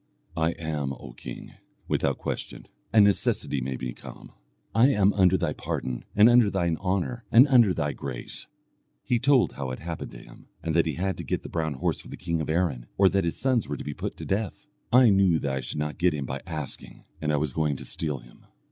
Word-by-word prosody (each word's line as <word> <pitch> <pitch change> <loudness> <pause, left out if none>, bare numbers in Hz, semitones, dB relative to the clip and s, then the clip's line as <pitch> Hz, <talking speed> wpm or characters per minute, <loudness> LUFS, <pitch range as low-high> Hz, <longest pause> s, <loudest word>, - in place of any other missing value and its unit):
"I 80 +1 +1
am, 75 -4 -3
O 60 -2 -10
king, - - -9 0.3
without - - 0
question, - - -5 0.3
and 110 -2 +7
necessity 95 -8 +1
made 65 0 -4
me 60 -1 -3
come. - - -12 0.4
I 115 +3 +6
am 105 -7 +3
under 95 -2 +4
thy 85 -5 -1
pardon, 60 -2 -4
and 105 +2 +7
under 120 -3 +6
thine 85 -4 0
honour, 95 +5 -2
and 125 +5 +8
under 120 -7 +6
thy 75 -4 -1
grace." 60 -3 -7 0.6
He 120 - +1
told 135 -1 +3
how 70 -2 -4
it 65 - -4
happened 85 0 -6
to - - -9
him, - - -15 0.2
and 80 -1 -1
that 85 -1 +3
he 80 - -2
had 95 +1 -2
to - - -5
get - - -2
the - - -7
brown 80 -3 -2
horse - - -1
for - - -14
the - - -8
king 85 -2 -2
of 80 - -4
Erin, 80 -7 0
or 95 -1 +6
that 95 -1 +1
his 85 - -2
sons 130 -4 +1
were - - -3
to - - -7
be 75 - -4
put - - -5
to - - -7
death. 105 +7 -2 0.3
"I 125 -2 +7
knew 95 -4 +4
that 70 -3 -2
I 65 - -1
should 65 - -4
not 75 -1 -3
get 90 -2 +3
him 70 -2 -3
by 70 +2 -5
asking, 75 -5 -7 0.2
and 75 -1 0
I 75 - +2
was 75 -3 -1
going 75 -3 0
to - - -6
steal 75 -4 -2
him." - - -17
85 Hz, 230 wpm, -26 LUFS, 70-100 Hz, 0.6 s, and